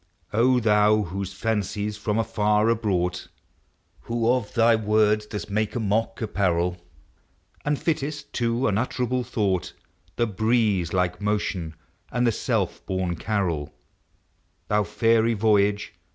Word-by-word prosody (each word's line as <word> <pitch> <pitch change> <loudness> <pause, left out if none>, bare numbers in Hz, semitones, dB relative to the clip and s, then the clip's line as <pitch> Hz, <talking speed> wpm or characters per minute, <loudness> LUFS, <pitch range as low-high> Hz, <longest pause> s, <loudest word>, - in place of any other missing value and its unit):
O 125 +3 +4
thou 105 -1 +4
whose 95 +1 -5
fancies 105 -1 -2
from 105 0 -2
afar 105 0 +2
are - - +3
brought; 90 -5 -1 0.7
Who 115 -1 -2
of 120 -5 -2
thy 115 0 +5
words 105 0 +2
dost 105 -1 -6
make 110 +1 -1
a - - 0
mock 110 +2 -1
apparel, 90 -4 0 0.8
And 145 0 0
fittest 150 -1 -3
to 120 +1 0
unutterable 125 +4 0
thought 100 -6 -1 0.4
The 120 - +1
breeze 110 -4 +1
like 90 0 0
motion 100 -6 -2 0.4
and 120 +1 +1
the 120 - +4
self - - -1
born 95 -2 -1
carol, 90 -8 -2 0.9
Thou 105 0 +2
fairy 115 +2 +2
voyager! 105 -1 +2
105 Hz, 125 wpm, -25 LUFS, 100-115 Hz, 0.9 s, thy